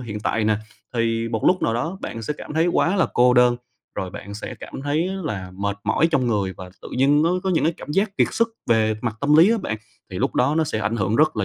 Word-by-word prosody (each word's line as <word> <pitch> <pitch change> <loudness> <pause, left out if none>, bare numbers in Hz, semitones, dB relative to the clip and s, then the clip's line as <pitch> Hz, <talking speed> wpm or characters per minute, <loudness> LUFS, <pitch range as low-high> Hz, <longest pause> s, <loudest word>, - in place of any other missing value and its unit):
hiện 105 -4 -6
tại 110 0 0
nè, 110 -1 +2 0.4
thì 115 0 0
một 110 -2 -3
lúc 180 0 +3
nào 115 - +1
đó 165 +11 -2
bạn 115 - -6
sẽ 150 - -2
cảm 150 - -8
thấy 165 +2 +3
quá 175 +2 +2
là 185 - +3
cô 125 +1 +5
đơn, 125 0 +5 0.4
rồi 95 -1 -4
bạn 100 +1 -8
sẽ 105 - -6
cảm 135 - -8
thấy 155 +5 0 0.2
là 95 -9 -4
mệt 100 +1 -2
mỏi 110 +9 +3
trong 135 -6 +1
người 100 -5 0
và 90 -1 -9
tự - - -8
dưng 145 +3 +4
nó 165 - +2
có 190 - 0
những 170 - +2
cái 160 +1 +1
cảm - - -9
giác 195 +2 0
kiệt - - +3
sức 230 0 +2 0.2
về 110 -1 +3
mặt 115 -3 -2
tâm 145 +1 +3
lý 170 +6 +7
á 230 - +2
bạn, 110 - -3 0.3
thì 90 - -5
lúc - - -1
đó 135 +4 +2
nó 160 - +2
sẽ 110 - -2
ảnh 110 +2 -1
hưởng 100 +2 0
rất 155 -5 +3
là 105 - 0
120 Hz, 275 wpm, -22 LUFS, 110-160 Hz, 0.4 s, lý